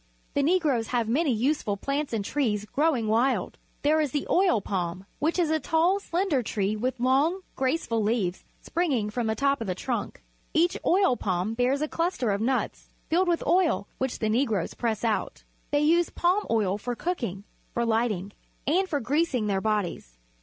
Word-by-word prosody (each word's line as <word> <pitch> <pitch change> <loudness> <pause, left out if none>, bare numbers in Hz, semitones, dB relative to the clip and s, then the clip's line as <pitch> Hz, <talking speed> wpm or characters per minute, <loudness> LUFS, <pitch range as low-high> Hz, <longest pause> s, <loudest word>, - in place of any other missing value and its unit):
The 285 - +2
Negroes 290 -7 +2
have 240 -3 0
many 280 +6 +2
useful 235 -3 0
plants 280 +6 -2
and 215 -4 -2
trees 215 -8 0
growing 275 -2 +1
wild. 235 +5 +1 0.2
There 310 +2 +4
is 300 - 0
the 290 - -1
oil 360 - +4
palm. 185 -1 -3 0.2
This 320 +4 +1
is 335 -3 +2
a 315 - +2
tall, 335 +6 +2
.slender 350 -7 0
tree 210 -2 -1
with 250 +4 -2
long, 280 +9 +2
graceful 260 -4 0
leaves 205 -4 0 0.2
springing 270 -12 0
from 240 0 -1
the 220 - 0
top 280 0 +1
of 225 - -3
the 185 - -1
trunk. 240 +5 -4 0.3
Each 340 +2 +3
oil 370 -8 +3
palm 185 +2 -1
bears 255 +5 +1
a - - 0
cluster 330 - -1
of 200 +1 -1
nuts, 255 +3 -1 0.2
filled 360 +3 +3
with 345 -1 +1
oil, 345 - +2
which 260 -1 -1
the 220 - -1
Negroes 220 -6 0
press 225 -3 -2
out. 225 -2 -1 0.3
They 290 0 +2
use 335 +3 +3
palm 370 +4 +1
oil 205 -3 +1
for 245 +3 -3
cooking, 235 - -3 0.3
for 235 - +1
light 230 +1 +2
ing, 200 -1 -4 0.3
and 370 +6 +2
for 290 - 0
greasing 275 -2 +1
their 195 -2 0
bodies. 195 - -2
255 Hz, 180 wpm, -27 LUFS, 215-315 Hz, 0.3 s, There